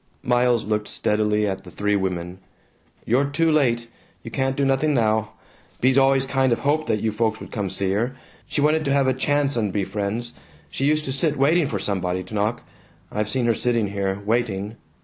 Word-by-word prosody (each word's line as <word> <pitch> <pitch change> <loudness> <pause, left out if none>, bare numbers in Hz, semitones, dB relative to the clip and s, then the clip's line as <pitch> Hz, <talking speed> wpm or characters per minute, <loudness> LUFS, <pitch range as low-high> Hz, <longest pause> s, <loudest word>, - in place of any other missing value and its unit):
Miles 125 -1 +2
looked 105 0 -1
steadily 105 0 +1
at 95 -1 -3
the 90 - -11
three 105 +3 0
women. 90 -2 -3 0.7
"You're 130 +5 +2
too 160 +3 +1
late. 120 -6 +2 0.4
You 115 - -8
can't 135 +1 0
do 140 - +1
nothing 135 +2 +2
now. 110 -2 +1 0.5
Bea's 130 +2 +4
always 135 0 +4
kind 135 -1 +1
of 115 - +3
hoped 150 +2 0
that 105 - 0
you 110 - +1
folks 110 0 0
would - - -10
come 100 -3 -2
see 95 +1 -1
her. 120 +7 -1 0.3
She 145 - -1
wanted 155 +2 +3
to 140 - +1
have 140 -1 +3
a 130 - +2
chance 145 +2 +1
and 105 -4 0
be 100 0 -1
friends. 105 +4 -3 0.4
She 135 - -1
used 155 +1 +2
to 135 - -2
sit 150 +3 +1
waiting 150 +4 +3
for - - -2
somebody 90 -2 -2
to 90 - -12
knock. 105 +2 -1 0.5
I've 105 0 -2
seen 125 +1 0
her 115 - +3
sitting 115 -2 0
here, 100 -1 -2
waiting. 110 -2 -1
115 Hz, 205 wpm, -23 LUFS, 105-135 Hz, 0.7 s, Bea's